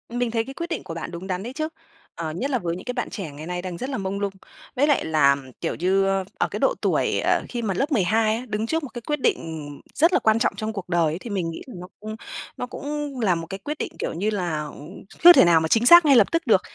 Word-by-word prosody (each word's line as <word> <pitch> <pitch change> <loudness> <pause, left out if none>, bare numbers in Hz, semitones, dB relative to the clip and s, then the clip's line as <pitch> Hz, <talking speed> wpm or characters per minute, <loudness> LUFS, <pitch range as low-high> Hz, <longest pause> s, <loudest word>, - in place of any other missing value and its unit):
Mình 240 0 -1
thấy 225 0 0
cái 270 - -9
quyết 335 +5 -5
định 335 - -3
của 175 - -7
bạn 165 0 -6
đúng 175 +2 -7
đắn 185 0 -3
đấy 245 +3 -6
chứ. 310 +2 -2 0.5
Ờ, 160 -2 -4
nhất 250 - -3
là 255 - +1
với 170 -4 -2
những 185 - -9
cái 250 - -3
bạn 245 -1 -3
trẻ 185 -8 -6
ngày 145 +2 -9
nay 180 0 -3
đang 180 -2 -6
rất 255 - -4
là 265 - -2
mông 195 0 -3
lung. 200 -1 -2 0.4
Với 285 +3 +3
lại 290 - +2
là, 145 -3 +4 0.3
kiểu - - -2
như, 190 +3 +2
ờ, 195 0 +1
ở - - +1
cái - - -4
độ - - +3
tuổi, - - +1
ờ, - - +2
khi 240 - -3
mà 210 -4 -1
lớp 275 - -1
12 220 -1 +2
á, 240 +3 -5
đứng 215 0 -2
trước 325 +5 -1
một 280 - -6
cái 240 - -6
quyết 295 +5 -2
định, - - +2
ừm, 150 -3 -8
rất 330 +4 +4
là 370 - +4
quan 220 +1 +3
trọng 235 - +1
trong 220 0 -4
cuộc 195 -4 -7
đời 170 -1 +2
ấy - - -3
thì 235 - -8
mình 185 -5 -2
nghĩ 165 - -7
là 255 - -10
nó 180 - -8
cũng 215 +1 -6 0.4
nó - - -3
cũng 290 0 -5
là 195 -6 +2
một 165 0 -5
cái 195 - -5
quyết 295 +10 -5
định, - - -4
kiểu - - -2
như 195 +6 -1
là, 190 -5 -2
à, - - -6 0.6
chưa 350 +1 +12
thể - - +7
nào 170 -1 +5
mà 160 - 0
chính 225 +8 +3
xác 345 +5 +9
ngay 280 -2 +6
lập 225 -5 +5
tức 330 -3 -1
được. 205 -5 +5
215 Hz, 300 wpm, -24 LUFS, 175-260 Hz, 0.6 s, chưa